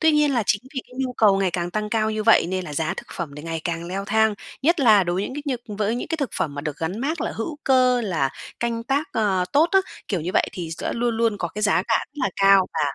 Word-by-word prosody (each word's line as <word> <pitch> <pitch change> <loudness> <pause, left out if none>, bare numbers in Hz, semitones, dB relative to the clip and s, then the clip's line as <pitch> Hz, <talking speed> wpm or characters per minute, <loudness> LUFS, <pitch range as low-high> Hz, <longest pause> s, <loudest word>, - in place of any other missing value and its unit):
Tuy 320 -1 +4
nhiên 300 -1 +3
là 240 -4 +2
chính 205 +2 +1
vì 260 - -1
cái 250 - -16
nhu 260 -1 -1
cầu 210 -5 +4
ngày 190 -2 +1
càng 175 0 -2
tăng 215 +1 -2
cao 220 -1 +1
như 215 0 -2
vậy, 225 -5 +5
nên 185 +1 -2
là 150 - -7
giá 160 +2 -1
thực - - -7
phẩm 170 -4 -4
thì 150 - -8
ngày 165 0 -4
càng 170 -1 -3
leo 190 +3 -4
thang, 220 +1 +2 0.3
nhất 335 +3 +3
là 215 -7 +6
đối 175 0 -1
với 195 - 0
những 260 - -6
cái 295 - -5 0.3
nh 205 - -5
với 210 +2 0
những 245 - -4
cái 325 - -1
thực 280 -6 -2
phẩm 145 - -1
mà 145 - -4
được 150 -1 -4
gắn 180 +6 -3
mác 300 +4 -2
là - - -2
hữu 290 +7 -4
cơ, 255 -2 +4
là 165 - 0 0.3
canh 235 -1 -1
tác, 280 +4 0
ờ, 195 -4 +1
tốt 310 +4 +4
á, 385 - +7 0.3
kiểu 190 -6 -1
như 170 - -3
vậy, - - +3
thì 175 -3 -5
sẽ - - -2
luôn 235 -1 -1
luôn 225 -2 +1
có 175 - -2
cái 210 +5 -6
giá 195 -3 +3
cả 225 - +4
rất - - -53
là - - +2
cao 195 -1 +5
và - - -2
215 Hz, 295 wpm, -23 LUFS, 180-250 Hz, 0.3 s, á